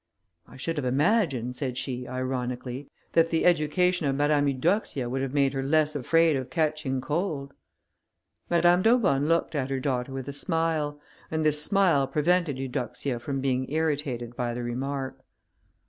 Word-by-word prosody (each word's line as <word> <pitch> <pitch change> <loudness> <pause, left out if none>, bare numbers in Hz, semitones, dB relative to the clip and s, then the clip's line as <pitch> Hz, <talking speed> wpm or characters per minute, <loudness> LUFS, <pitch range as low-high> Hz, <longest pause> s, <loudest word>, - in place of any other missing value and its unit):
"I - - -14
should 165 +5 -3
have 145 - -1
imagined," 135 - +1
said 130 -2 -3
she, 125 -1 -3
ironically, 130 +1 -4 0.2
"that 165 0 +4
the 165 - +1
education 175 0 +2
of 135 - +1
Mademoiselle 145 0 +2
Eudoxia 150 - 0
would 130 +2 -2
have 135 +1 -3
made 140 -1 +3
her 135 - -1
less 155 +2 +2
afraid 165 +3 +3
of 130 -1 -3
catching 150 -2 -1
cold." 145 -1 -2 1.0
Madame 175 +1 +4
d'Aubonne 190 - +3
looked 165 +1 +1
at 135 -3 -1
her 135 -1 -1
daughter 130 -1 -2
with 135 -1 -5
a 140 - -4
smile, 160 -2 -1 0.3
and 160 0 -1
this 150 -1 +3
smile 175 -8 +3
prevented 165 -1 +1
Eudoxia 130 -1 -3
from 135 +2 -3
being 130 0 -1
irritated 145 -6 -1
by 120 -1 -2
the 120 - -4
remark. 130 +2 -3
140 Hz, 160 wpm, -27 LUFS, 130-160 Hz, 1.0 s, that